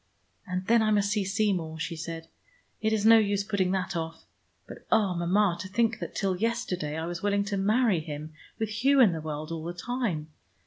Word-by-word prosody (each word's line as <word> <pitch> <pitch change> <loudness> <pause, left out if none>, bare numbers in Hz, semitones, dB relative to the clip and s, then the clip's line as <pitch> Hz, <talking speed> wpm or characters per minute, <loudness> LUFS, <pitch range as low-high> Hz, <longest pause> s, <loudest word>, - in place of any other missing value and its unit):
"And 185 0 -3
then 230 +3 +4
I 215 - +2
must 205 -1 +2
see 210 -1 +1
Seymour," 190 -5 -1
she 165 - -3
said. 165 0 -6 0.5
"It 220 - +1
is 215 -1 +1
no 225 0 +8
use 205 -2 +1
putting 200 -3 0
that 190 0 -2
off. 165 -1 -5 0.4
But, - - -10
oh, 200 -4 +3
Mama, 175 +2 +2
to 185 - -5
think 225 +3 +1
that - - -6
till 195 -2 0
yesterday 180 -8 -2
I 160 - -3
was 175 0 -5
willing 200 0 +1
to 200 0 -3
marry 210 0 +2
him, 155 0 -7 0.2
with 220 -1 -2
Hugh 265 +6 +3
in 230 -7 +7
the 160 -1 -4
world 155 +1 -5
all 165 -1 -4
the 170 +1 -5
time. 180 -8 -3
195 Hz, 210 wpm, -28 LUFS, 165-215 Hz, 0.5 s, no